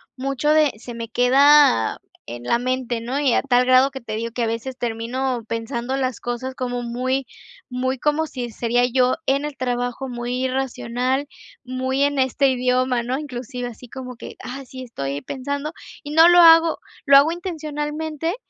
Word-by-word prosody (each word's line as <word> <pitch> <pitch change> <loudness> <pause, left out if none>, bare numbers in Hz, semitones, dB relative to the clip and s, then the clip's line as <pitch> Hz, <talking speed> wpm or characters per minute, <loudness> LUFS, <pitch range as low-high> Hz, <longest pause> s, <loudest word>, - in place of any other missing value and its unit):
mucho 275 +2 -2
de 305 -2 +4
se 240 +2 -9
me 230 -1 -6
queda 260 - +5 0.3
en 120 +1 -7
la 180 - +1
mente, 250 -2 -2
¿no? 250 +5 -2
Y 275 -4 +2
a - - +3
tal 250 -2 +2
grado 255 +1 +5
que 270 -1 -8
te 220 -3 -6
digo 230 +1 -3
que 235 +1 -2
a - - 0
veces 230 +3 -4
termino 240 +2 -2
pensando 235 +3 -3
las 255 -4 -2
cosas 245 +2 -4
como 245 -1 -3
muy 255 +3 -2 0.4
muy 260 +1 -2
como 300 +4 0
si 245 -5 -6
sería 240 +2 +1
yo 250 +1 +2
en 275 +2 +1
el 295 -1 -5
trabajo, 245 +1 -2
muy 245 +1 -3
irracional, 260 +1 -1 0.4
muy 260 +1 -1
en 285 -1 +1
este 265 +1 +2
idioma 250 0 +1
¿no? 250 +3 -2
Inclusive 250 -3 -6
así 240 +1 -13
como 255 0 -8
que, - - -9
ah, 270 +2 -6
sí, 260 +1 -9
estoy 140 - -5
pensando 285 +3 -4 0.3
y 290 - -7
no 325 +3 +7
lo 350 - +6
hago, 330 -1 +7 0.3
lo 280 -1 +8
hago 285 +4 +5
intencionalmente, 315 -1 -4
255 Hz, 180 wpm, -22 LUFS, 245-280 Hz, 0.4 s, lo